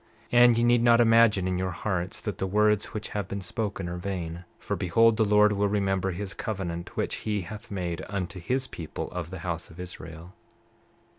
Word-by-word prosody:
29:3 120 - +6
And 120 -1 +6
ye 120 - +2
need 120 0 +4
not 120 0 +5
imagine 115 -5 +5
in 90 -1 -1
your 95 0 -1
hearts 90 0 -3
that 105 -4 -4
the 95 - -1
words 105 +1 +3
which 105 -1 -6
have 105 -3 -3
been 100 +1 -4
spoken 100 0 -3
are 85 0 -4
vain, 90 -2 -4
for - - -3
behold, 115 +6 +4
the 110 - +3
Lord 105 0 +5
will 100 0 +1
remember 95 -2 0
his 95 +2 -4
covenant 85 -5 -5
which - - -1
he 105 -2 -2
hath 105 +4 -9
made 90 -4 -3
unto 100 -1 -4
his 130 +9 -1
people 85 -11 -6
of 90 -2 -5
the 95 -2 -7
house 85 -1 -3
of 80 - -14
Israel. 85 -1 -9
95 Hz, 205 wpm, -27 LUFS, 90-105 Hz, -, 29:3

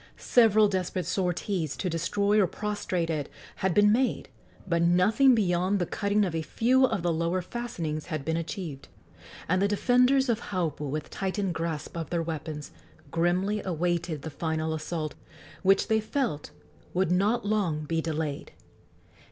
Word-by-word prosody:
Several 220 -3 +5
desperate 185 -2 -2
sorties, 180 -4 -1
to 190 - -2
destroy 200 +5 +1
or 190 - +3
prostrate 185 -4 -2
it, 150 -3 -3 0.3
had 190 - 0
been 205 0 +6
made, 250 +3 +1 0.4
but 170 -2 +1
nothing 210 +10 +5
beyond 185 -1 +1
the 180 - 0
cutting 205 +3 +1
of 180 - -3
a 165 - -1
few 250 - +3
of 195 -8 -1
the 175 -1 +1
lower 170 +3 0
fastenings 175 -7 -4
had 155 -5 -4
been 160 +1 0
achieved; 165 -4 -5 0.6
and 185 +2 +2
the 200 - +4
defenders 250 +6 +3
of 230 -2 +1
Haupu, 160 -6 -2
with 150 +2 -4
tightened 195 -1 -2
grasp 165 -2 -4
of 165 -3 -4
their 170 -1 0
weapons, 155 -2 -5 0.4
grimly 180 +5 +1
awaited 175 -3 -1
the 160 - -5
final 160 0 -2
assault, 155 -1 -3 0.5
which 195 0 +3
they 220 0 +3
felt 220 - -2 0.5
would 185 -1 +2
not 205 +6 +2
long 185 -8 0
be 165 +1 0
delayed. 155 -3 -3
180 Hz, 155 wpm, -28 LUFS, 160-205 Hz, 0.6 s, been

